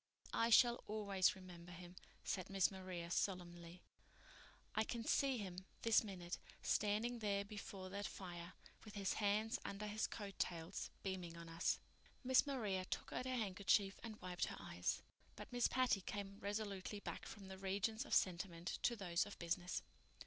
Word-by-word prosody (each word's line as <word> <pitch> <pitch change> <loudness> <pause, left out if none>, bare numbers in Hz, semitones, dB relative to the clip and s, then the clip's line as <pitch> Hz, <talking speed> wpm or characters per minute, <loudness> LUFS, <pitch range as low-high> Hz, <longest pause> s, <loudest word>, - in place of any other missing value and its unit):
"I 230 - +4
shall 240 +1 +7
always 205 -2 +3
remember 175 -2 -10
him," 175 +1 -9 0.3
said 185 -1 -1
Miss 195 -1 +4
Maria 185 -3 -5
solemnly. 175 -2 -1 0.9
"I 220 - +3
can 230 +1 -3
see 270 -2 +3
him, 185 -3 -5 0.2
this 230 -1 +6
minute, 180 -4 -4 0.2
standing 215 +4 +2
there 200 -2 +1
before 200 -2 -6
that 200 +1 -2
fire, 175 -2 -6 0.3
with 215 -2 -10
his 195 -2 +1
hands 210 +2 +2
under 200 +1 -3
his 210 +1 0
coat 200 -3 -6
tails, 170 +1 -1
beaming 180 -3 -3
on 170 0 -7
us." 165 +1 +2 0.5
Miss 260 +3 +6
Maria 210 -9 0
took - - -3
out 255 - -1
her 255 0 0
handkerchief 200 -2 +3
and 220 -2 -6
wiped 180 -1 0
her - - -5
eyes; - - -1 0.3
but - - -8
Miss 245 -1 +4
Patty 255 -6 +3
came 200 +1 -4
resolutely 205 -1 -2
back - - -5
from 195 -2 -8
the 190 0 -7
regions 200 +4 0
of - - +1
sentiment 175 -1 +1
to 240 - +3
those 180 -3 +1
of 205 - -8
business. 175 +1 -1
195 Hz, 165 wpm, -42 LUFS, 180-215 Hz, 0.9 s, shall